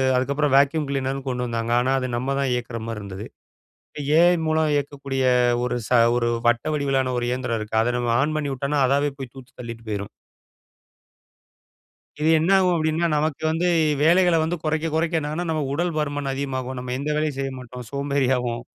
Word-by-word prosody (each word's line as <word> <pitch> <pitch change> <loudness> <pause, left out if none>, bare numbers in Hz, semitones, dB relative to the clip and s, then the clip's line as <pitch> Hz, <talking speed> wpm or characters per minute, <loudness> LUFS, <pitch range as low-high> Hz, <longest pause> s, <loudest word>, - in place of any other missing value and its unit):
அதுக்கப்பறம் 140 +2 0
வேக்யூஅம் 140 +1 +2
க்ளீனருன்னு 135 0 -2
கொண்டு 125 -1 -2
வந்தாங்க. 115 0 -2
ஆனா 125 +2 +1
அது 130 - -2
நம்ம 135 +3 -1
தான் 135 -2 0
இயக்குற 120 -1 -3
மாரி 115 -2 -4
இருந்தது. 100 +1 -7 0.9
ஏ. - - +6
ஐ. - - +2
மூலம் 155 0 +2
இயக்கக்கூடிய 140 -2 -2 0.4
ஒரு 125 - -1
ச - - -13 0.3
ஒரு 120 -1 +1 0.2
வட்ட 120 0 +2
வடிவிலான 135 -3 0
ஒரு 120 - -1
இயந்திரம் 125 -2 -2
இருக்கு. 110 +1 -5
அதை 120 +2 +1
நம்ம 120 -1 0
ஆன் 155 +2 0
பண்ணிவுட்டோனா, 140 0 -1
அதாவே 140 +2 +2
போய் 130 -3 -7
தூத்தி 130 -1 -13
தள்ளிட்டு 115 -1 -9
போயிரும். 100 -1 -3 2.1
இது 155 - +2
என்ன 165 +4 +1
ஆகும் 180 -2 +3
அப்படின்னா, 160 +1 +1
நமக்கு 150 0 -1
வந்து 165 +3 0 0.4
வேலைகள 175 +1 +4
வந்து 170 +2 -1
குறைக்க 160 +1 0
குறைக்க 165 +1 +1
என்ன 145 - -4
ஆகும்னா, 170 +3 -3
நம்ம 155 -2 -1
உடல் 175 +1 -1
பருமன் 145 -2 -2
அதிகமாகும். 130 -2 -4
நம்ம 125 0 -4
எந்த 145 +2 -3
வேலையும் 150 -3 -1
செய்ய 135 0 -3
மாட்டோம். 125 -1 -9
சோம்பேறியாவோம். 130 -4 0
135 Hz, 175 wpm, -23 LUFS, 125-155 Hz, 2.1 s, ஏ